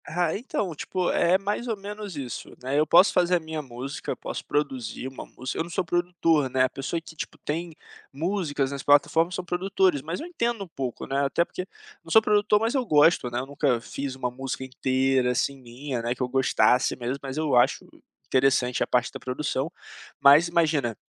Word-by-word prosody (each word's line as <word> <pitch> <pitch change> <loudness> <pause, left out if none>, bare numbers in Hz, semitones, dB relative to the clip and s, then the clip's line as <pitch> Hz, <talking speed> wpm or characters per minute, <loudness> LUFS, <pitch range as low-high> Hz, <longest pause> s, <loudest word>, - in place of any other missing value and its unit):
Rá 175 0 -1
então 200 -5 -3
tipo, 180 +4 -1
é 180 +2 +3
mais 205 +5 -3
ou 225 -3 -2
menos 205 -1 -7
isso, 135 -4 -6
né, 135 +3 0
eu 155 - +2
posso 180 +6 +6
fazer 180 0 +3
a - - +2
minha 160 -1 -5
música, 130 +1 -6
posso - - -6
produzir 135 -4 -2
uma 130 - -8
música, 130 +1 -6
eu - - +1
não 170 - -10
sou 180 +1 -1
produtor, 165 -4 +1
né, 130 0 +2
a 130 - +2
pessoa 135 +5 -3
que, 165 0 -13
tipo, - - -6
tem 165 +2 -4 0.4
músicas 150 -3 -1
nas 140 -1 -4
plataformas 160 +5 +3
são 185 - -4
produtores 185 -3 +1
mas 165 +5 -4
eu - - -6
entendo 235 - -2
um - - -10
pouco, 135 -7 -5
né, 140 +1 0
até 140 +5 +1
porque 185 +1 -6 0.4
não - - -14
sou 220 - +8
produtor 210 -1 +3
mas 225 +2 0
eu 265 -2 +1
gosto, 150 - +4
né, 120 +1 -2
nunca 135 -2 0
fiz 135 +3 -5
uma 125 -2 -3
música 130 +1 -5
inteira, 130 0 +1
assim, 140 +2 0
minha, 125 +1 -5
né, 120 +2 -1
que 130 - -10
eu - - 0
gostasse 130 -1 +2
mesmo 125 +2 -3
mas 135 +1 -6
eu 155 -4 +1
acho 120 - +3 0.4
interessante 130 -2 +2
a - - +2
parte 125 0 +1
da 135 - -8
produção, 130 +4 -2 0.5
mas 145 +5 +7
imagina 155 -9 +1
145 Hz, 200 wpm, -26 LUFS, 130-175 Hz, 0.5 s, sou